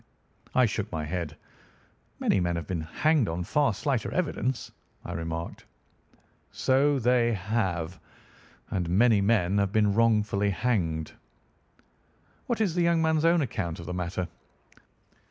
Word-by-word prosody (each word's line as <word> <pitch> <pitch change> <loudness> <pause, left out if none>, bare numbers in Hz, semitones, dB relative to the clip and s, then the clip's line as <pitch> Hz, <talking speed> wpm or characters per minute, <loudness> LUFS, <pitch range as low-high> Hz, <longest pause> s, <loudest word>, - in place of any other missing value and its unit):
I 130 - +6
shook 105 -1 -3
my 80 -2 -3
head. 85 -1 -4 0.8
"Many - - +2
men 85 -1 0
have 85 -2 -3
been 85 0 -3
hanged 135 - +1
on 85 +2 -2
far 140 - +2
slighter 130 +1 -1
evidence," 135 -7 -2 0.3
I - - -5
remarked. 80 0 -5 0.9
"So 140 +2 +2
they 120 -1 +3
have. 95 -4 -2 0.7
And 90 -3 -1
many 105 +3 +4
men 100 -2 +2
have 100 -1 +1
been 105 -1 +3
wrongfully 105 -2 +2
hanged." 90 -8 -1 1.4
"What 240 -2 -1
is 195 -6 +1
the 175 - +1
young 170 -1 +3
man's 160 0 +2
own 170 0 +4
account 85 -9 -3
of 85 - -8
the 90 - -4
matter?" 90 0 -3
105 Hz, 135 wpm, -27 LUFS, 85-130 Hz, 1.4 s, I